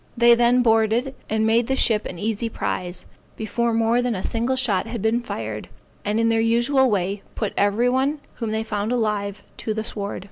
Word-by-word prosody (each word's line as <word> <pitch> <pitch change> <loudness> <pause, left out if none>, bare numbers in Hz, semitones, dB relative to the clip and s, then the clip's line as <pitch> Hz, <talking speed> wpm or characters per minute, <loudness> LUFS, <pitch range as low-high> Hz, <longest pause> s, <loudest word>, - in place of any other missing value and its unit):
They 235 0 +7
then 240 +1 +4
boarded, 225 +3 +2 0.2
and 220 0 +1
made 225 +1 +3
the 265 - +1
ship 220 -5 +2
an 180 - -7
easy 220 +3 -2
prize, 180 -4 -3 0.3
before 230 +2 -1
more 230 +1 +2
than 245 -2 -1
a 185 - -4
single 235 +3 0
shot 230 -7 +1
had 235 0 -4
been 220 +4 +1
fired, 110 - -5 0.3
and 210 +2 0
in 230 0 +3
their 225 0 +2
usual 240 +4 +3
way, 195 -1 -1
put 210 -3 -2
every 205 +4 +2
one 265 +4 +1 0.2
whom 230 -3 -3
they 220 +1 -1
found 210 0 -2
alive 210 -4 -1
to 215 - -3
the 220 - -2
sword. 205 -2 -4
225 Hz, 200 wpm, -23 LUFS, 210-240 Hz, 0.3 s, They